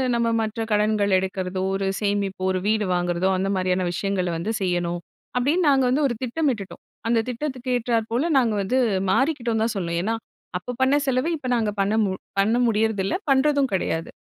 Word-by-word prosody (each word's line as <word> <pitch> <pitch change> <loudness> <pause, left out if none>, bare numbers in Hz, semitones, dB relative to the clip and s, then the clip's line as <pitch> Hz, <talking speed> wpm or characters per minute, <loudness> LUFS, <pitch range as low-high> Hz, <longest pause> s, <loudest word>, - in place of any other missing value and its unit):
நம்ம 235 0 +1
மற்ற 220 +1 -3
கடன்கள் 210 -2 +2
எடுக்கிறதோ, 185 0 -3
ஒரு 195 0 -1 0.2
சேமிப்பு, 200 -2 -1
ஒரு 185 - 0
வீடு 215 -1 +2
வாங்குறதோ, 175 +1 0
அந்த 195 +1 -1
மாதிரியான 185 0 0
விஷயங்கள 195 -2 -1
வந்து 200 +7 -2
செய்யணும். 175 -1 0 0.4
அப்டின்னு 300 +6 +2
நாங்க 270 -2 +4
வந்து 285 +4 +2
ஒரு 240 - -2
திட்டமிட்டுட்டோம்! 245 -7 -2 0.3
அந்த 235 - +3
திட்டத்துக்கு 255 0 -4
ஏற்றாற் 230 -2 -1
போல 255 +7 +1
நாங்க 235 -4 +3
வந்து 255 +7 +1 0.3
மாறிக்கிட்டோன்னு 240 -5 +1
தான் 230 - -2
சொல்லணும்! 170 -2 -1
ஏன்னா, 225 +2 0 0.4
அப்போ 250 - -6
பண்ண 270 +2 +4
செலவ 255 +4 +1
இப்ப 255 -3 -5
நாங்க 220 -2 +1
பண்ண 200 +2 +1
மு 190 - -1 0.3
பண்ண 215 +4 +3
முடியறதில்ல. 215 - +1 0.2
பண்றதும் 280 0 +3
கெடையாது, 165 -3 -1
220 Hz, 170 wpm, -23 LUFS, 190-250 Hz, 0.4 s, நாங்க